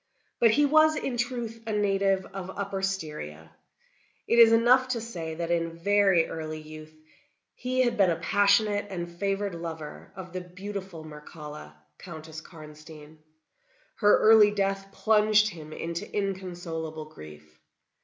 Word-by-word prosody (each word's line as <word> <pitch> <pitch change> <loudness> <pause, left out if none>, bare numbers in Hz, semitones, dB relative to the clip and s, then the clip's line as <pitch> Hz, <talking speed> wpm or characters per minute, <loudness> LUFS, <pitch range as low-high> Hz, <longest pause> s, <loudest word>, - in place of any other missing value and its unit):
But 230 - +6
he 290 +7 +4
was, 310 +2 +5
in 265 -4 -3
truth, 240 -2 -3
a 220 - -2
native 195 -2 +1
of 190 -1 -6
Upper 200 -1 -3
Styria. 150 - -5 0.8
It 235 - +3
is 230 -1 +9
enough 245 +3 +5
to 255 -2 -2
say 170 -8 -6
that 170 +1 -3
in 165 -1 -1
very 195 -2 +3
early 155 -1 -5
youth 155 0 -11 0.6
he 255 +1 -1
had 240 -2 +1
been 195 -3 +4
a 170 - +1
passionate 205 +4 +2
and 175 -3 -4
favored 200 -1 -1
lover 165 -2 -7
of 185 -2 -9
the 185 - -4
beautiful 185 -1 -8
Mircalla, 150 - -10 0.2
Countess 160 -2 -9
Karnstein. 155 -1 -13 0.8
Her 205 -1 +5
early 215 -1 +7
death 195 -1 -2
plunged 215 0 +3
him 155 -5 -10
into 170 +2 -5
inconsolable 175 -5 -4
grief. 75 - -14
190 Hz, 140 wpm, -27 LUFS, 160-210 Hz, 0.8 s, is